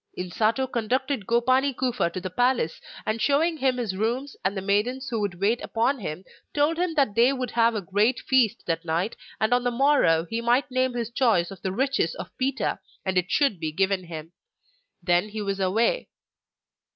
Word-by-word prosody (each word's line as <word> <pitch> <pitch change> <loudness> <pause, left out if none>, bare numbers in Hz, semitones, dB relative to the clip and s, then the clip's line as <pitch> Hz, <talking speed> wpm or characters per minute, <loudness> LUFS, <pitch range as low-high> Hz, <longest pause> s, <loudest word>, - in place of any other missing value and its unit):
Insato 215 +8 0
conducted 255 -1 -1
Gopani 255 +3 +2
Kufa 250 -8 0
to 185 - -5
the 185 0 -6
palace, 245 -7 +1 0.2
and 215 +1 -1
showing 315 +4 +2
him 260 -3 +1
his 225 -6 -2
rooms, 240 +7 -2
and 195 +1 0
the - - 0
maidens 235 +7 0
who 230 -3 -1
would 190 -4 -3
wait 215 +5 +1
upon 245 +4 0
him, 180 -3 -5 0.3
told 300 +3 +2
him 355 -2 0
that 275 -8 +2
they 235 +4 +4
would 255 -2 -3
have 230 0 +3
a 205 - -2
great 210 +7 +1
feast 255 -5 +2
that 165 0 -1
night, 170 +6 -1 0.2
and 220 +3 +2
on 245 0 +2
the 245 - +2
morrow 240 - +3
he 225 +6 -3
might 245 +3 +2
name 255 -1 +1
his 235 -1 -3
choice 225 -9 +2
of 195 - -10
the 190 - -2
riches 270 - 0
of - - -9
Pita 265 +1 -1 0.3
and 190 0 -1
it 180 -1 +1
should 275 - +2
be 160 -1 -2
given 190 +2 0
him. 165 -1 -8 0.7
Then 175 +3 +2
he 215 0 -5
was 195 -1 -2
away. 220 - +1
230 Hz, 195 wpm, -25 LUFS, 190-260 Hz, 0.7 s, they